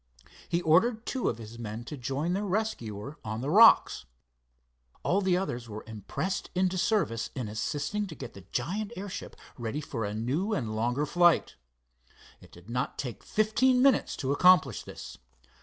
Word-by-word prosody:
He 170 +1 0
ordered 220 +9 +3
two 260 - -1
of - - -3
his 115 +1 -10
men 110 0 -5
to 150 - -7
join 140 +6 -2
their 200 +2 -1
rescuer 145 - -3
on 110 +1 -4
the 140 +3 -2
rocks. 220 - +6 1.0
All 195 +3 +2
the 185 -2 +2
others 120 -11 -3
were 105 0 -7
impressed 110 - -4
into 185 0 +1
service 185 - 0
in 125 -4 -3
assisting 145 - -2
to 160 - -9
get - - -8
the 100 - -11
giant 190 - -2
airship 195 0 -6 0.2
ready 120 +5 -3
for 135 -6 -4
a 105 0 -3
new 145 - -1
and 110 -5 -3
longer 120 +6 0
flight. 175 +2 +3 0.8
It - - -17
did 90 +2 -16
not 125 +2 -2
take 125 -4 -5
fifteen 250 +4 +2
minutes 275 -1 +3
to 135 - -2
accomplish 155 - +5
this. - - -9
145 Hz, 165 wpm, -29 LUFS, 115-195 Hz, 1.0 s, rocks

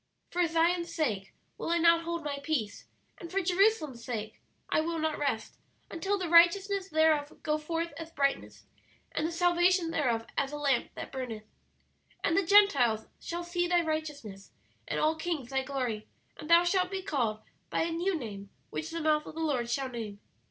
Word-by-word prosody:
"'For 350 -1 +2
Zion's 340 +1 +1
sake 220 - -1 0.3
will - - -3
I 340 - +3
not 335 0 +4
hold 340 0 -3
My 285 -1 -3
peace, 275 -9 -2 0.3
and 340 - -8
for 390 - +1
Jerusalem's 355 - +2
sake 220 -3 -5 0.3
I - - +2
will 335 +1 -2
not 315 -1 -1
rest, 275 -7 -2 0.3
until 390 +5 -1
the 370 -3 -3
righteousness 380 +4 +4
thereof 310 -2 +2
go 305 0 0
forth 330 +2 -3
as 325 0 -7
brightness, 275 -3 -1 0.5
and 315 - -1
the - - -4
salvation 350 0 +3
thereof 240 -8 0
as 275 0 0
a 295 - -4
lamp 280 -4 +1
that - - -7
burneth. 245 -5 -5 0.8
"'And 330 - +2
the 390 - +4
Gentiles 285 - +5
shall 345 +1 -4
see 350 0 -1
thy 350 0 +3
righteousness, 295 -11 -4 0.4
and - - -1
all 310 +1 +3
kings 320 -6 -3
thy 265 0 +1
glory; 255 -5 -3 0.3
and 300 - -10
thou 340 +1 +7
shalt 365 +1 +1
be 385 -1 -4
called 235 - -1 0.3
by - - 0
a 335 - -2
new 345 +2 0
name 200 -7 -7 0.2
which 155 0 -4
the 330 - -4
mouth 305 -1 +2
of - - -9
the - - -5
Lord 260 -7 0
shall 265 +2 -1
name. 220 -5 -6
315 Hz, 185 wpm, -30 LUFS, 265-345 Hz, 0.8 s, thou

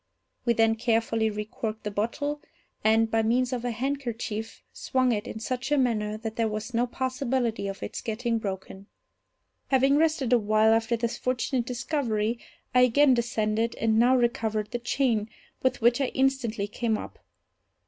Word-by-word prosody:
We 235 - +4
then 225 0 +3
carefully 225 -1 +1
recorked 215 +1 -5
the 210 - -3
bottle, 285 +8 -2 0.4
and, 225 +1 +3
by 225 - +3
means 245 +3 +1
of 245 -1 -3
a 245 - -1
handkerchief, 235 -3 -4
swung 255 -2 +1
it 215 +1 -2
in 220 - -6
such 250 +4 -3
a 295 - +4
manner 215 -5 0
that 220 0 -6
there 230 -1 +2
was 215 +3 -4
no 240 +2 +1
possibility 255 -4 -1
of 195 0 -6
its - - -5
getting 230 +1 -1
broken. 195 -1 -6 0.8
Having 270 +1 +4
rested 310 -6 +2
a 245 - +6
while 215 +1 +3
after 225 +1 +1
this 235 +1 -2
fortunate 250 -1 -1
discovery, 240 -4 -1 0.3
I 250 - +5
again 260 +3 +5
descended, 230 -1 0
and 220 0 +2
now 250 +2 +5
recovered 220 -3 0
the 240 - -2
chain, 235 -3 0 0.3
with 260 -2 0
which 240 +3 +4
I 270 - +2
instantly 265 -6 0
came 220 +1 -1
up. - - -9
235 Hz, 165 wpm, -27 LUFS, 220-255 Hz, 0.8 s, a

